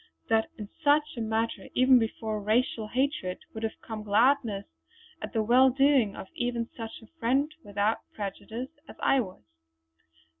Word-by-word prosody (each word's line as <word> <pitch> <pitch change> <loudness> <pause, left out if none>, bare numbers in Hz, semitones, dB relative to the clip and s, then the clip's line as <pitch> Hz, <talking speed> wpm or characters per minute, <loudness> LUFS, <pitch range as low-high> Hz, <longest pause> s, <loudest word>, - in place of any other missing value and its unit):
That 225 0 +3
in 210 - -6 0.2
such 295 0 +3
a 235 - -4
matter 225 +1 -1
even 255 0 +6
before 220 -1 -2
racial 220 +1 +1
hatred 250 -7 -1 0.2
would 220 - -6
have 225 -1 -3
come 220 -2 -6
gladness 215 -1 +2 0.6
at - - -5
the 220 -2 +1
well 250 +4 +6
doing 270 -5 +3
of - - -7
even 240 -1 -1
such 225 -1 -7
a 325 +9 -21
friend 270 +6 +1
without 205 +2 0 0.2
prejudice 220 +5 -5 0.2
as - - -10
I 270 - +3
was. 185 - -5
230 Hz, 155 wpm, -28 LUFS, 215-260 Hz, 0.6 s, even